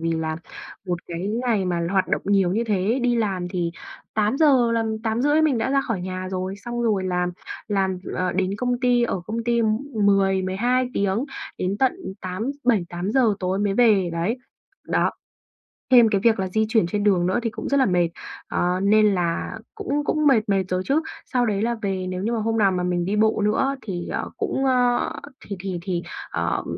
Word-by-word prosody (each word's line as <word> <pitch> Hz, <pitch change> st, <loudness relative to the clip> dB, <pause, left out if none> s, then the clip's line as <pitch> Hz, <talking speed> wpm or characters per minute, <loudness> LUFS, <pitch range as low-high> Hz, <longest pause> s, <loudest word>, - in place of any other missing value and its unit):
vì 165 Hz, 0 st, 0 dB
là 160 Hz, -1 st, -2 dB, 0.5 s
một 175 Hz, -1 st, -1 dB
cái 170 Hz, -1 st, -5 dB, 0.3 s
ngày 215 Hz, -5 st, +2 dB
mà 170 Hz, -2 st, -1 dB
hoạt 190 Hz, -1 st, +1 dB
động -, -, 0 dB
nhiều 195 Hz, -3 st, +2 dB
như 230 Hz, +3 st, 0 dB
thế, 210 Hz, +3 st, +1 dB
đi 245 Hz, -1 st, +2 dB
làm 195 Hz, -6 st, -1 dB
thì 175 Hz, -2 st, -2 dB, 0.4 s
8:00 245 Hz, +2 st, +3 dB
làm 225 Hz, -1 st, 0 dB
8:30 260 Hz, +8 st, +2 dB
mình 285 Hz, -7 st, +2 dB
đã 245 Hz, -, 0 dB
ra 275 Hz, 0 st, +3 dB
khỏi 225 Hz, -8 st, -3 dB
nhà 185 Hz, +1 st, -4 dB
rồi, 185 Hz, +1 st, -3 dB
xong 240 Hz, +2 st, -4 dB
rồi 210 Hz, -5 st, +1 dB
làm 180 Hz, -1 st, 0 dB, 0.4 s
làm 190 Hz, -2 st, 0 dB, 0.2 s
ờ, 180 Hz, -1 st, -1 dB
đến 185 Hz, 0 st, 0 dB
công 245 Hz, +1 st, -1 dB
ty, 245 Hz, -1 st, +3 dB
ở 195 Hz, -5 st, -1 dB
công 230 Hz, +1 st, -3 dB
ty 235 Hz, 0 st, +2 dB, 0.3 s
10-12 200 Hz, +4 st, +2 dB
tiếng 200 Hz, +6 st, 0 dB, 0.3 s
đến 185 Hz, +2 st, -1 dB
tận 265 Hz, -1 st, +3 dB, 0.3 s
tám 185 Hz, +7 st, -3 dB
7:00-8:00 210 Hz, +1 st, +1 dB
tối 185 Hz, +1 st, -1 dB
mới 205 Hz, -1 st, 0 dB
về, 205 Hz, -7 st, +4 dB
đấy. 170 Hz, +9 st, -1 dB, 0.5 s
Đó. -, -, +2 dB, 0.8 s
Thêm 240 Hz, -3 st, +7 dB
cái 200 Hz, -2 st, +1 dB
việc 230 Hz, -3 st, +4 dB
là 190 Hz, -, 0 dB
di 220 Hz, +4 st, +1 dB
chuyển 220 Hz, -6 st, +3 dB
trên 205 Hz, +3 st, -1 dB
đường 185 Hz, -4 st, +3 dB
nữa 195 Hz, +6 st, +1 dB
thì 230 Hz, -, 0 dB
cũng -, -, -6 dB
rất 280 Hz, -, +2 dB
là 265 Hz, -, +4 dB
mệt, 175 Hz, -3 st, +2 dB, 0.4 s
ờ, 180 Hz, +1 st, 0 dB
nên 210 Hz, -1 st, +4 dB
là 175 Hz, +5 st, -2 dB, 0.2 s
cũng 290 Hz, +1 st, -2 dB
cũng 305 Hz, -1 st, +2 dB
mệt 220 Hz, -6 st, +3 dB
mệt 195 Hz, -1 st, +2 dB
rồi 185 Hz, 0 st, 0 dB
chứ. 290 Hz, +4 st, +2 dB, 0.3 s
Sau 245 Hz, -1 st, +3 dB
đấy 205 Hz, -3 st, 0 dB
là 235 Hz, +1 st, 0 dB
về, 190 Hz, -2 st, -2 dB
nếu 185 Hz, +1 st, -4 dB
như 230 Hz, -, 0 dB
mà 230 Hz, -, 0 dB
hôm 225 Hz, +1 st, 0 dB
nào 200 Hz, -3 st, +4 dB
mà 180 Hz, -1 st, -1 dB
mình 175 Hz, -1 st, 0 dB
đi 200 Hz, +2 st, -1 dB
bộ 220 Hz, 0 st, +2 dB
nữa 210 Hz, -, +2 dB
á 275 Hz, -, -2 dB
thì, 180 Hz, -5 st, -5 dB
ờ, -, -, -3 dB
cũng, 270 Hz, -, -1 dB
á 245 Hz, -2 st, +3 dB, 0.5 s
thì 200 Hz, -, -4 dB
thì 185 Hz, -2 st, -4 dB
thì, 175 Hz, -1 st, -2 dB, 0.3 s
ờ, -, -, -1 dB
205 Hz, 205 wpm, -23 LUFS, 185-235 Hz, 0.8 s, Thêm